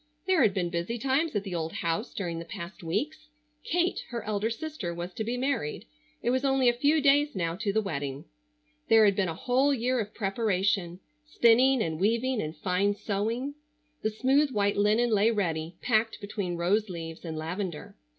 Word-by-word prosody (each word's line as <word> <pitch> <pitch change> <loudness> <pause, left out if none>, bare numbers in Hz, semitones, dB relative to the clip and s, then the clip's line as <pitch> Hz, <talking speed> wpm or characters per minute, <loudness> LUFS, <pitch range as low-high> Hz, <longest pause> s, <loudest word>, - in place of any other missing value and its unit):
There 375 -3 +3
had 215 -6 +3
been 175 -3 -1
busy 175 +7 -2
times 270 +4 0
at 205 - 0
the 195 -3 -6
old 165 -1 -3
house 170 +7 -2
during 170 -4 -4
the - - -5
past 170 +2 -8
weeks. 270 - -3 0.4
Kate, 355 +2 0
her 235 -1 -4
elder 210 +1 -1
sister, 230 - -5
was 175 +1 -5
to 220 - -3
be 235 +3 -2
married. 255 - -2 0.4
It 240 - +2
was 260 +1 +1
only 270 -2 +3
a 240 - +5
few 290 +6 +2
days 285 0 +4
now 170 -3 -1
to 210 -1 -1
the 220 +2 +1
wedding. 140 -7 -4 0.6
There 220 -1 +7
had 200 -2 +4
been 190 -2 +1
a 165 - -4
whole 260 - +2
year 250 +1 0
of 210 -1 -4
preparation: 195 -3 0 0.2
spinning 255 -3 +4
and 160 -1 -3
weaving 235 +5 +1
and 155 +1 -5
fine 190 +5 +1
sewing. 225 +7 -2 0.5
The 215 - +1
smooth 265 +7 +2
white 205 -4 +1
linen 215 +4 +3
lay 210 +1 +4
ready, 170 -6 -1
packed 225 -2 +1
between 200 -4 -4
rose 200 +5 +1
leaves 165 -2 -7
and 160 -2 -5
lavender. 170 +1 -5
210 Hz, 190 wpm, -28 LUFS, 175-245 Hz, 0.6 s, There